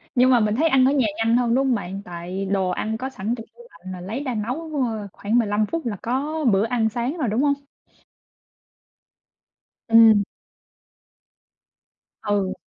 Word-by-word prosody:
Nhưng 250 Hz, 0 st, +5 dB
mà 245 Hz, -, +5 dB
mình 215 Hz, -1 st, +1 dB
thấy 310 Hz, +7 st, +2 dB
ăn 265 Hz, -2 st, +4 dB
ở 265 Hz, -, +4 dB
nhà 270 Hz, -5 st, +2 dB
nhanh 225 Hz, +1 st, +2 dB
hơn, 240 Hz, -1 st, +1 dB
đúng 270 Hz, +1 st, +2 dB
hông 255 Hz, -, +2 dB
bạn? 195 Hz, -2 st, -5 dB
Tại 180 Hz, +2 st, -5 dB
đồ 190 Hz, -1 st, 0 dB
ăn 220 Hz, +4 st, -2 dB
có 260 Hz, +3 st, -4 dB
sẵn 225 Hz, -2 st, -3 dB
trong 225 Hz, -, -9 dB
tủ 480 Hz, -, -15 dB
lạnh 185 Hz, -, -11 dB
mà 180 Hz, -, -8 dB
lấy 220 Hz, +10 st, -5 dB
ra 255 Hz, -4 st, -3 dB
nấu 250 Hz, +10 st, -4 dB, 0.4 s
khoảng 215 Hz, +4 st, -1 dB
15 215 Hz, -1 st, +1 dB
phút 330 Hz, +7 st, -4 dB
là 225 Hz, -3 st, -2 dB
có 290 Hz, +6 st, -2 dB
bữa 195 Hz, +2 st, +3 dB
ăn 230 Hz, -1 st, +1 dB
sáng 240 Hz, +8 st, -3 dB
rồi, 270 Hz, -8 st, -1 dB
đúng 220 Hz, +5 st, 0 dB
hông? 285 Hz, -1 st, +3 dB, 2.4 s
Ừm. 225 Hz, -2 st, +7 dB, 2.0 s
Ừ. 200 Hz, -2 st, 0 dB
230 Hz, 175 wpm, -23 LUFS, 205-260 Hz, 2.4 s, Ừm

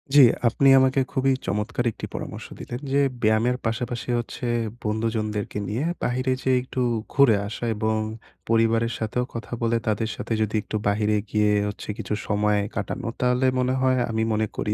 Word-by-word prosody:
জি, 145 Hz, -, +10 dB, 0.3 s
আপনি 135 Hz, +4 st, +3 dB
আমাকে 130 Hz, +1 st, +3 dB
খুবই 135 Hz, +1 st, +2 dB
চমৎকার 105 Hz, +4 st, -1 dB
একটি -, -, -7 dB
পরামর্শ -, -, -6 dB
দিলেন 120 Hz, -, -6 dB
যে 140 Hz, -, +4 dB, 0.2 s
ব্যায়ামের 110 Hz, +3 st, +2 dB
পাশাপাশি 120 Hz, +2 st, -2 dB
হচ্ছে, 120 Hz, +1 st, -5 dB, 0.4 s
বন্ধুজনদেরকে 110 Hz, -1 st, -2 dB
নিয়ে 115 Hz, +9 st, -1 dB, 0.2 s
বাহিরে 130 Hz, +1 st, +1 dB
যেয়ে 130 Hz, -1 st, +3 dB
একটু 130 Hz, 0 st, -4 dB, 0.3 s
ঘুরে 140 Hz, -6 st, +6 dB
আসা 110 Hz, +3 st, -5 dB
এবং 110 Hz, +1 st, 0 dB, 0.5 s
পরিবারের 115 Hz, +1 st, +2 dB
সাথেও 115 Hz, +3 st, -1 dB
কথা 115 Hz, -, -7 dB
বলে 115 Hz, 0 st, +2 dB
তাদের 110 Hz, +1 st, 0 dB
সাথে -, -, -3 dB
যদি 110 Hz, 0 st, 0 dB
একটু -, -, -6 dB
বাহিরে 105 Hz, +1 st, +2 dB
গিয়ে 105 Hz, -1 st, +2 dB, 0.2 s
হচ্ছে 105 Hz, -, -7 dB
কিছু -, -, -4 dB
সময় 105 Hz, 0 st, +2 dB, 0.2 s
কাটানো। 100 Hz, +3 st, -3 dB
তাহলে 125 Hz, +1 st, +2 dB
মনে 125 Hz, 0 st, +1 dB
হয় 130 Hz, 0 st, +3 dB
আমি 110 Hz, 0 st, 0 dB
মনে 110 Hz, 0 st, +1 dB
করি 105 Hz, -, -1 dB
115 Hz, 165 wpm, -24 LUFS, 105-125 Hz, 0.5 s, জি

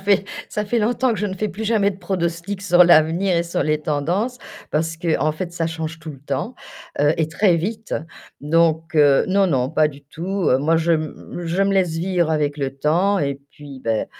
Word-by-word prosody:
fait 195 Hz, 0 st, +2 dB, 0.2 s
ça 210 Hz, -, -3 dB
fait 235 Hz, +3 st, 0 dB
longtemps 240 Hz, +3 st, +1 dB
que 210 Hz, -, -3 dB
je 210 Hz, -, 0 dB
ne 190 Hz, -, -4 dB
fais 215 Hz, +3 st, -2 dB
plus 210 Hz, +2 st, -7 dB
jamais 210 Hz, -2 st, +2 dB
de 190 Hz, -, -8 dB
pronostic 180 Hz, +1 st, -3 dB
sur 180 Hz, -2 st, +5 dB
l'avenir 170 Hz, +3 st, +4 dB
et 170 Hz, -, +2 dB
sur 170 Hz, 0 st, -2 dB
les 155 Hz, 0 st, +1 dB
tendances, 170 Hz, -, -1 dB, 0.3 s
parce 160 Hz, +1 st, -1 dB
qu'en 160 Hz, -2 st, 0 dB
fait, 170 Hz, +3 st, -5 dB
ça 170 Hz, -1 st, -1 dB
change 160 Hz, 0 st, -5 dB
tout 160 Hz, 0 st, -8 dB
le 135 Hz, -, -11 dB
temps, 140 Hz, -, -4 dB, 0.5 s
heu, 145 Hz, +1 st, +4 dB
et 160 Hz, -1 st, 0 dB
très 175 Hz, +2 st, +2 dB
vite. 210 Hz, +6 st, -3 dB, 0.5 s
Donc, 160 Hz, +2 st, +1 dB
heu, 145 Hz, -2 st, +5 dB
non 195 Hz, +1 st, +3 dB
non, 130 Hz, -6 st, 0 dB
pas 155 Hz, -1 st, +3 dB
du 145 Hz, -1 st, -13 dB
tout, 175 Hz, +6 st, -3 dB
heu. 130 Hz, -, +4 dB
Moi, 160 Hz, +4 st, +2 dB
je 165 Hz, +1 st, +2 dB
me 160 Hz, +2 st, -4 dB
je 175 Hz, +4 st, +1 dB
me 195 Hz, 0 st, +2 dB
laisse 190 Hz, -3 st, +2 dB
vivre 175 Hz, -1 st, 0 dB
avec 150 Hz, -2 st, 0 dB
le 135 Hz, -2 st, -3 dB
temps 175 Hz, +8 st, +2 dB
et 140 Hz, -1 st, -1 dB
puis 140 Hz, -3 st, -11 dB
ben, 110 Hz, -1 st, 0 dB
170 Hz, 215 wpm, -21 LUFS, 150-195 Hz, 0.5 s, sur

